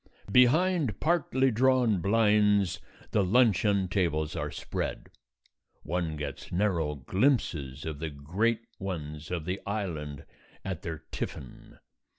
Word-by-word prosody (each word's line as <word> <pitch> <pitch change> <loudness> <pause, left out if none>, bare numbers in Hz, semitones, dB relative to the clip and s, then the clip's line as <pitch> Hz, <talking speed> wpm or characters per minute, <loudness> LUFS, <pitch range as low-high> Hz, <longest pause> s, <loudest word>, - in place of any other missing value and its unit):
Behind 140 - +4
partly 135 -6 +2
drawn 120 -4 +3
blinds 105 -1 +3 0.3
the 105 - +3
luncheon 100 -2 +3
tables 80 -5 0
are - - -2
spread; - - -4 0.7
one 85 -1 -2
gets 75 -2 -6
narrow 85 -6 0
glimpses 75 - 0
of 80 -3 -4
the 80 0 -3
great 95 +11 -1 0.2
ones 75 -5 -5
of 85 -3 -3
the 90 +2 -3
Island 80 -9 -4 0.4
at 95 -4 -4
their 80 -2 -6
tiffin. 65 - -7
95 Hz, 115 wpm, -29 LUFS, 80-110 Hz, 0.7 s, Behind